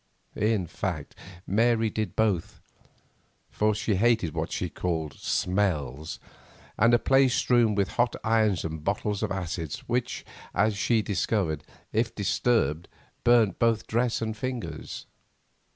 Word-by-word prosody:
In 105 -3 +1
fact, 85 -3 -4 0.3
Mary 115 +2 +2
did 110 -5 -3
both, 105 -7 0 0.9
for 105 0 +1
she 105 -1 0
hated 110 -7 +2
what - - -3
she - - -2
called 80 -5 -3
"smells," 80 -8 -1 0.6
and 115 +3 +4
a - - +6
place 135 0 +3
strewn 120 -4 +3
with 100 -1 +1
hot 120 0 +1
irons 110 -5 +2
and 80 -1 -5
bottles 100 +2 -1
of - - -1
acids, 85 -4 -4
which, 120 0 -2 0.3
as 105 +2 +2
she 110 +1 +2
discovered, 95 -6 0 0.3
if 115 +1 0
disturbed 95 - +1 0.4
burnt 115 -6 +4
both 115 -2 +2
dress 115 0 0
and 110 -1 -3
fingers. 125 +1 -5
105 Hz, 130 wpm, -27 LUFS, 90-115 Hz, 0.9 s, a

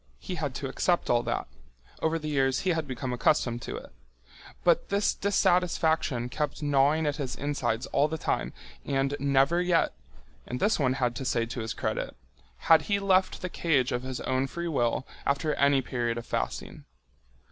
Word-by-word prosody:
He 185 - -6
had 150 -6 -3
to 140 - -3
accept 175 +6 +1
all 120 -1 +4
that. - - -2 0.6
Over 160 +1 +1
the 155 -1 -6
years 135 -3 +1
he 185 - +1
had 160 -3 -1
become 130 -1 -4
accustomed 120 -1 +1
to - - -5
it. - - -11 0.7
But 170 -2 +3
this 200 +1 +2
dissatisfaction 170 -9 +1
kept 150 +5 -3
gnawing 145 +2 +3
at 145 0 0
his 130 -4 -3
insides 125 -5 -1
all 145 +2 +2
the 160 +1 -3
time - - -1 0.3
and 135 0 0
never 140 +5 +3
yet—and 125 - -2
this 210 -2 +2
one 130 -3 +2
had 125 -2 0
to - - -4
say 120 -2 +1
to 120 +2 -6
his 110 0 -4
credit—had 65 - 0
he 200 +6 0
left 190 -2 +2
the - - 0
cage 145 -8 +1
of 125 - -1
his 130 0 -5
own 130 +1 0
free 170 +5 -4
will 130 -4 0 0.2
after 145 +2 0
any 140 -2 +3
period 120 -2 -2
of 120 - -5
fasting. - - -4
140 Hz, 175 wpm, -28 LUFS, 125-160 Hz, 0.7 s, all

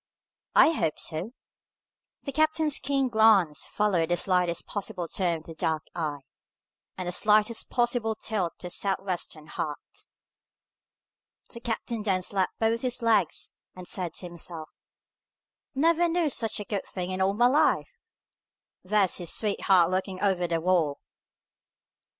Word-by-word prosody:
"I - - +7
hope 160 - -1
so." 170 +9 -3 0.9
The 275 - -4
captain's 310 0 +2
keen 275 0 0
glance 220 - +4
followed 185 -6 +1
the 175 - +2
slightest 180 -3 +1
possible 195 -4 -4
turn 175 -1 0
of 155 - -13
the 165 - -10
dark 160 -1 -1
eye, 150 -4 -3 0.8
and 185 -1 -4
the - - -1
slightest 215 +4 +2
possible 240 -2 0
tilt 200 -6 -2
of - - -29
the 180 - -6
Sou'wester 185 -6 -2
hat. 150 -1 -4 1.7
The 235 - -8
captain 235 -1 -3
then 190 -3 0
slapped 190 0 -1
both 225 +1 +1
his 250 -1 -1
legs, 220 -8 +1 0.2
and 180 -1 -10
said 175 -3 -3
to - - -6
himself, 170 -2 -5 1.1
"Never 335 +4 +3
knew 330 -3 +1
such 225 -4 -1
a 205 - -5
good 200 -2 -3
thing 180 -1 -4
in 185 0 -2
all 195 +1 +2
my 240 +3 +4
life! 270 +5 +2 0.8
There's 195 0 +2
his 175 -3 -1
sweetheart 190 -4 +3
looking 185 0 -2
over 185 -3 +1
the 165 -1 0
wall!" 165 -4 +1
195 Hz, 145 wpm, -27 LUFS, 175-230 Hz, 1.7 s, I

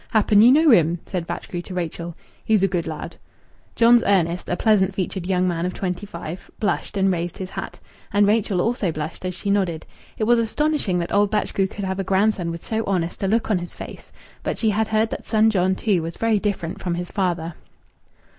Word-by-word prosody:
Happen 210 -1 +4
ye 235 - +8
know 305 +3 +6
him?" 170 -5 +4
said 180 -3 -4
Batchgrew 175 0 -5
to 180 +1 -9
Rachel. 170 -1 -4 0.3
"He's 215 -3 +2
a - - +5
good 175 -3 -2
lad." 155 -2 -6 0.6
John's 235 0 +6
Ernest, 180 -3 +1
a 175 - 0
pleasant 195 -4 +3
featured 185 -1 -3
young 185 -1 +2
man 170 -2 -1
of 180 +1 -2
twenty 190 +2 -3
five, 170 -1 -8
blushed 205 0 -1
and 195 0 +3
raised 175 -1 -3
his 190 0 -6
hat. - - -6 0.3
And 205 0 +4
Rachel 205 -3 +2
also 225 -6 0
blushed 155 +3 -6
as 185 -1 -3
she 200 +2 -2
nodded. 180 -6 0 0.3
It - - -1
was 235 +2 +4
astonishing 230 -3 0
that 170 -1 -3
old 205 0 +3
Batchgrew 200 -2 0
could 200 0 -6
have 190 0 -3
a - - 0
grandson 190 -1 +1
with 165 0 -6
so 225 0 -1
honest 175 -4 -1
a 195 - +1
look 220 +2 +1
on 195 - +2
his 175 0 -8
face, - - -10 0.3
but - - -3
she 220 -2 +2
had 220 +1 0
heard 220 +1 +1
that - - -5
son 220 0 +3
John, 190 -2 +2
too, 195 -4 +1
was 165 +1 -6
very 225 -2 +2
different 195 -2 -3
from 175 -2 -1
his 175 0 -5
father. 175 -4 -1
190 Hz, 215 wpm, -22 LUFS, 175-215 Hz, 0.6 s, ye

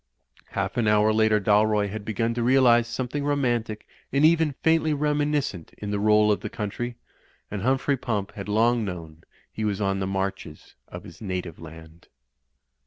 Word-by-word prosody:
Half - - -2
an 115 -3 +1
hour 105 +1 +4
later 110 -1 +3
Dalroy 105 0 +2
had 105 +1 -6
begun 115 +2 -1
to 120 - -2
realise 120 -1 +4
something 130 +4 -3
romantic 120 -7 -1 0.3
and 140 +3 +3
even 160 -3 +3
faintly 160 -1 +3
reminis 150 0 +1
cent 90 - -8
in 105 -1 -5
the 105 - -1
roll 105 0 +4
of 105 - +1
the - - -6
country, 120 +3 -4 0.6
and 105 -2 -4
Humphrey 135 +4 +1
Pump 105 -5 -3
had 100 0 -8
long 115 +2 +2
known 85 -4 -7 0.3
he 110 - -4
was 105 -2 -1
on 95 -1 0
the 95 - -2
marches 95 0 -4
of - - -9
his - - -13
native 90 -5 -5
land. 80 +1 -13
110 Hz, 175 wpm, -25 LUFS, 100-130 Hz, 0.6 s, hour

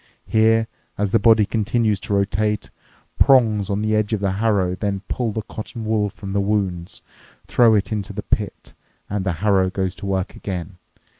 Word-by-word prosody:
Here, 110 0 +3 0.3
as 100 -1 -1
the 115 - +4
body 110 -2 +5
continues 110 -1 0
to 100 - -4
rotate, 105 +1 0 0.5
prongs 110 -7 +4
on 100 +1 -1
the 110 0 +1
edge 110 0 0
of 110 - 0
the 100 -1 0
harrow 100 -3 +1
then 100 +1 -2
pull 120 -3 -1
the 110 +1 -4
cotton 110 +2 -7
wool 110 -1 +1
from 95 0 -8
the 100 - +1
wounds, 95 -4 -2 0.4
throw 115 -3 +4
it 105 +2 0
into 105 -1 -3
the 105 0 -5
pit, 105 -2 -3 0.4
and 100 -2 -1
the 95 -2 -1
harrow 95 -3 +3
goes 95 -1 -2
to 100 - -6
work 95 0 -2
again. 90 -1 -6
105 Hz, 180 wpm, -21 LUFS, 95-110 Hz, 0.5 s, body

